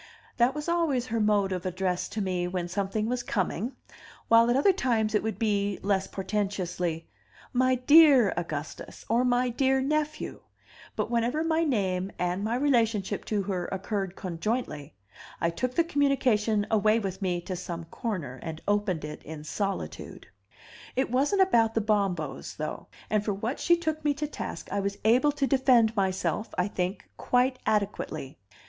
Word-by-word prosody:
That 250 +3 +3
was 300 +1 -4
always 330 -8 +1
her 230 -2 -2
mode 205 -2 +2
of 180 -2 -2
address 185 0 -2
to 220 - -3
me 180 -2 -1
when 180 -1 -3
something 200 +4 -2
was 245 +1 -1
coming, 215 +3 -2 0.6
while 230 +1 +6
at 240 - +3
other 335 +9 +4
times 230 - 0
it 210 - +3
would 220 0 -3
be, 205 -3 0
less 195 -1 +1
portentously, 185 -5 -2 0.5
"My 255 +1 +3
dear 270 - +6
Augustus," 155 -3 -6
or 235 +3 +3
"My 250 0 +2
dear 265 +2 +2
nephew 300 +3 -2 0.3
"; - - -21
but - - -2
whenever 240 +6 +1
my 325 0 +1
name 195 - 0
and 180 +2 -1
my 225 +3 0
relationship 230 -7 +1
to 205 -2 -1
her 185 -2 -2
occurred 195 -1 -3
conjointly, 170 - -3 0.4
I 170 - +1
took 255 +8 -3
the 335 - +4
communication 255 -9 +2
away 215 0 +4
with 195 -4 -4
me 180 -2 0
to 185 +1 -5
some 175 -1 -5
corner, 165 - -5
and 160 -1 -6
opened 205 -6 0
it 150 0 -7
in 155 0 -8
solitude. 195 +5 -4 0.7
It 265 -2 0
wasn't 290 +10 +3
about 230 -12 +2
the - - +3
Bombos, 195 -8 -1
though; 155 - -5 0.2
and 215 -1 +2
for 205 -2 -1
what 225 +7 -3
she 345 0 +4
took 315 -2 -3
me 295 -1 +2
to 300 +1 -2
task 300 - -6
I 200 - 0
was 200 0 -2
able 250 +7 +5
to 280 -1 0
defend 250 -4 +4
myself, 190 0 -1
I 180 +3 +1
think, 185 0 -3
quite 255 +1 +1
adequately. 195 -9 -2
210 Hz, 165 wpm, -28 LUFS, 185-255 Hz, 0.7 s, while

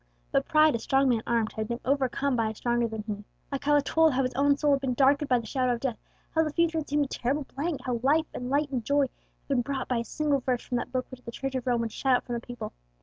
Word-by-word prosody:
But - - +1
pride, 310 -1 +5
a 230 - -1
strong 270 +3 +2
man 235 -3 +2
armed, 230 -2 +1
had 220 -1 -3
been 235 +1 -3
overcome 275 0 +1
by 225 -2 +1
a 220 - -6
stronger 240 +1 0
than 220 -1 -5
he. 210 -1 -5 0.3
Alcala 290 +1 +2
told 320 0 +3
how 265 +1 +2
his 255 - -2
own 280 +2 +3
soul 295 0 +2
had 275 -1 +2
been 260 -2 -1
darkened 280 +2 +3
by 250 - +5
the 235 - -4
shadow 255 +2 +1
of 235 - -3
death, 245 -3 -2 0.3
how 320 - +3
the 310 - -1
future 330 +1 +1
had 305 - -6
seemed 295 0 +2
a - - -6
terrible 270 +3 -1
blank, 320 +5 -1
and 285 - -6
how 245 -2 -2
life 300 +5 +3
and 250 0 -5
light 285 +1 +1
and 250 -4 -1
joy 285 +4 +2
had 265 - -10
been 270 -3 +2
brought 265 +1 -3
by 250 - 0
a 230 - -1
single 295 +2 0
verse 255 -1 -1
from 245 - -2
that 240 - -4
Book 255 0 -1
which 260 -1 -10
the 235 - -9
Church 270 +2 -4
of 260 -1 -3
Rome 240 -2 +2
would 230 -1 -2
shut 265 +2 +2
out - - -1
from 240 - -4
the 235 - -2
people. 245 - -7
260 Hz, 295 wpm, -28 LUFS, 240-285 Hz, 0.3 s, pride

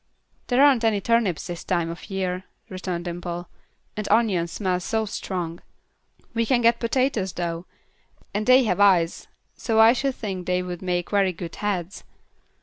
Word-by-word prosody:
"There 255 +2 +4
aren't 265 -5 +4
any 220 -2 +2
turnips 220 -5 +1
this 175 -1 -6
time 170 -2 0
of 170 - -10
year," 185 -1 -2 0.2
returned 185 -2 -4
Dimple, 175 0 -5 0.5
"and 210 -1 -4
onions 200 -7 +2
smell 185 -3 0
so 220 +4 -1
strong. 180 -5 -4 0.7
We 230 0 +1
can 240 +1 +2
get 235 0 +4
potatoes, 230 -6 0
though, 170 0 -4 0.7
and 210 +2 -2
they 255 +1 +7
have 200 -5 0
eyes, 180 -5 +3 0.3
so 225 -2 0
I 225 +1 +8
should 270 +1 -1
think 190 -5 -5
they 180 0 +1
would 180 -1 -6
make 180 -2 -2
very 195 -3 +2
good 170 0 -7
heads." 195 -3 -3
190 Hz, 160 wpm, -24 LUFS, 175-225 Hz, 0.7 s, I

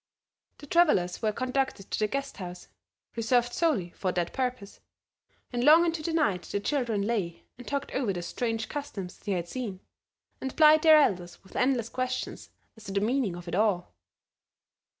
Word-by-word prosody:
The - - -11
travelers 285 - +3
were 215 -2 +1
conducted 255 -3 -2
to - - -1
the 215 - +2
guest 275 +4 -4
house, 180 -2 -8 0.5
reserved 240 +1 +1
solely 245 - +1
for 185 0 -2
that 175 -1 -1
purpose, 250 -6 -3 0.7
and 240 0 0
long 320 +5 +7
into 330 -1 -1
the 330 - -2
night 290 - +1
the 200 - -3
children 230 -3 0
lay 200 -6 -2 0.2
and 245 - -11
talked 280 0 -3
over 255 -6 0
the 175 -2 -4
strange 225 +4 -2
customs 205 -11 -6
they 205 - -2
had 175 -2 -2
seen, 215 -4 -5 0.6
and 265 -1 -5
plied 310 0 +7
their 315 -1 +8
elders 180 -11 +1
with 190 - -18
endless 250 -3 +1
questions 255 +1 -4 0.3
as 220 -1 -15
to 195 - -6
the 200 - +2
meaning 220 -3 0
of 175 0 -10
it 170 - -5
all. 195 -2 +1
230 Hz, 175 wpm, -28 LUFS, 190-275 Hz, 0.7 s, their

